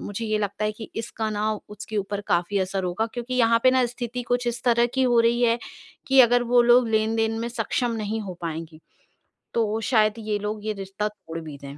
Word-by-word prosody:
मुझे 205 +3 -5
ये 215 0 0
लगता 205 0 -2
है 210 - 0
कि 220 +1 -9
इसका 225 -1 -3
ना 215 +1 0 0.2
उसके 210 +1 -7
ऊपर 200 0 -2
काफ़ी 175 +4 +1
असर 190 0 -1
होगा 190 +6 -1
क्योंकि 245 +1 -4
यहाँ 230 -2 +4
पे 255 - +6
ना 255 -1 +3
स्थिति 245 0 -5
कुछ 245 0 0
इस 240 0 -2
तरह 235 -1 +4
की 265 - +2
हो 240 -2 +3
रही 235 +1 +2
है 235 0 +3 0.5
कि 270 0 +6
अगर 245 0 +5
वो 240 -1 +7
लोग 240 0 +5
लेन-देन 225 0 +1
में 235 - -2
सक्षम 240 +1 -1
नहीं 220 +2 -2
हो 190 -3 -6
पाएँगे, 160 -1 -5 0.7
तो 225 -1 0
शायद 215 -3 +4
ये 215 -1 -2
लोग 210 +1 -4
यह 215 - -1
रिश्ता 195 +2 -3
तोड़ 165 -5 -9
भी 155 -3 -9
दें। 140 +1 -10
220 Hz, 220 wpm, -24 LUFS, 205-240 Hz, 0.7 s, वो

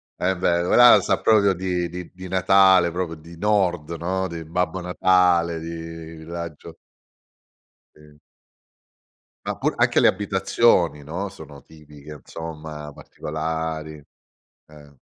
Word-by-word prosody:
È 95 +1 -1
vero, 85 0 0
ora 120 0 +7
sa - - 0
proprio 100 -3 +4
di 90 -1 -2
di 90 -1 -8
di 95 0 -10
Natale, 95 -1 +4
proprio 85 -2 -4
di 85 +2 -14
nord, 90 -6 0
no? 95 +3 -2
Di 85 -1 -7
Babbo 90 +3 -2
Natale, 90 -2 +2
di 80 -1 -8
raggio 85 -2 -8 1.2
Sì. 75 -1 -19 1.3
Ma - - -3
pur - - -1
anche - - +3
le - - +5
abitazioni, 95 -5 +1
no, 85 +8 -5
sono 75 -6 -13
tipiche, 75 -1 -15
insomma, 75 0 -8
particolari, 80 0 -5 0.7
eh. 75 -2 -17
85 Hz, 120 wpm, -22 LUFS, 80-95 Hz, 1.3 s, ora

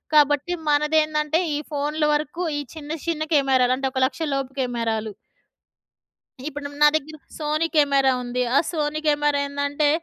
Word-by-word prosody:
కాబట్టి 290 +3 +4 0.2
మనదేందంటే 300 +1 +2 0.2
ఈ - - -2
ఫోన్‍ల 295 +2 -1
వరకు 305 +4 -2 0.2
ఈ - - -2
చిన్న 300 -1 -8 0.2
చిన్న 320 -2 0
కెమెరాలు 260 -3 +3
అంటే 270 0 -1
ఒక 260 - -2
1,00,000 275 - -4
లోపు 270 -1 -2
కెమెరాలు. 225 -3 -2 1.3
ఇప్పుడు 290 -1 -5
నా 295 - +9
దగ్గర 310 0 -3 0.2
సోనీ 310 +1 0
కెమెరా 275 -3 +4
ఉంది. 245 0 -3 0.2
ఆ - - +7
సోనీ 305 -2 -1
కెమెరా 295 -1 +2
ఏందంటే 285 +1 0
290 Hz, 145 wpm, -23 LUFS, 270-305 Hz, 1.3 s, నా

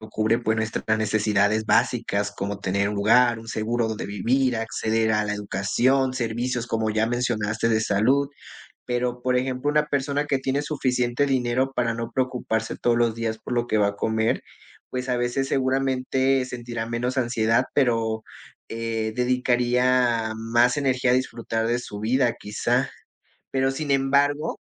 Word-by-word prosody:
nos 110 0 -11
cubre, 110 +2 +1
pues, 110 -2 0
nuestras 110 0 -1
necesidades 110 0 +1
básicas, 115 -4 +1
como 100 +1 -4
tener 100 +1 0
un 105 - -3
lugar, 115 +3 +4
un 115 0 -11
seguro 115 +1 -1
donde 110 -1 -4
vivir, 120 +5 +1
acceder 110 0 0
a 105 0 +2
la 105 - -1
educación, 125 +6 +1
servicios, 120 0 -2
como 110 -1 -1
ya 110 +1 +1
mencionaste, 115 -2 -1
de 110 -1 +2
salud, 125 +8 +2 0.6
pero, 125 0 -2
por 125 0 +2
ejemplo, 130 +3 -1
una 150 0 +2
persona 145 +1 -1
que 135 - +1
tiene 135 +2 -1
suficiente 130 -3 0
dinero 130 0 0
para 115 -2 0
no 115 0 -5
preocuparse 125 -4 -2
todos 120 -1 +2
los 120 -1 +1
días 115 -1 -3
por - - -6
lo 120 0 +1
que 110 - 0
va 100 - +4
a 100 - -3
comer, 110 +2 0 0.5
pues, 125 0 -3
a 125 - +1
veces 120 +3 -1
seguramente 130 0 +1
sentirá 120 -2 -5
menos 125 +3 -2
ansiedad, 120 0 +1
pero, 115 -4 +1 0.5
eh, 115 -1 -3
dedicaría 125 -2 +2
más 120 +3 +2
energía 130 -3 +1
a - - +4
disfrutar 115 -3 -1
de 120 +1 +1
su 105 -4 -7
vida 120 +2 +2
quizá, 105 0 0 0.6
pero 135 0 +1
sin 145 +1 -4
embargo 140 +2 +1
120 Hz, 160 wpm, -24 LUFS, 110-130 Hz, 0.6 s, lugar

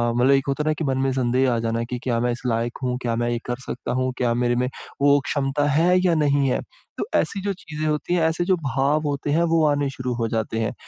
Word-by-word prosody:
मतलब 125 +3 +4
एक 135 0 +3
होता 140 +2 0
है 155 - -4
ना - - +3
कि 155 +1 -4
मन 135 -2 0
में 135 - +1
संदेह 130 0 +2
आ - - 0
जाना 115 0 -1
कि 125 - -2
क्या 120 -3 0
मैं 120 +1 +1
इस 120 - -5
लायक 115 0 -1
हूँ? 125 -1 0
क्या 115 -2 -1
मैं 120 +1 0
ये 120 -1 -1
कर 125 0 -3
सकता - - -5
हूँ? 130 0 0
क्या 120 -2 +1
मेरे 120 0 +1
में 125 +1 +1 0.3
वो 145 0 +5
क्षमता 145 0 0
है 175 +5 +4
या 175 - +4
नहीं 145 -2 +2
है? - - +1 0.4
तो - - -2
ऐसी 200 - 0
जो 200 -1 0
चीज़ें 155 -3 -6
होती 150 +3 -1
हैं, 175 - +2
ऐसे 160 +2 -1
जो 185 0 +3
भाव 140 0 0
होते 145 0 -2
हैं 165 +3 +3
वो 165 - +4
आने 145 -1 +1
शुरू 130 -2 -4
हो 115 -1 -1
जाते 110 0 -2
हैं। 115 +3 -1
135 Hz, 270 wpm, -23 LUFS, 120-150 Hz, 0.4 s, वो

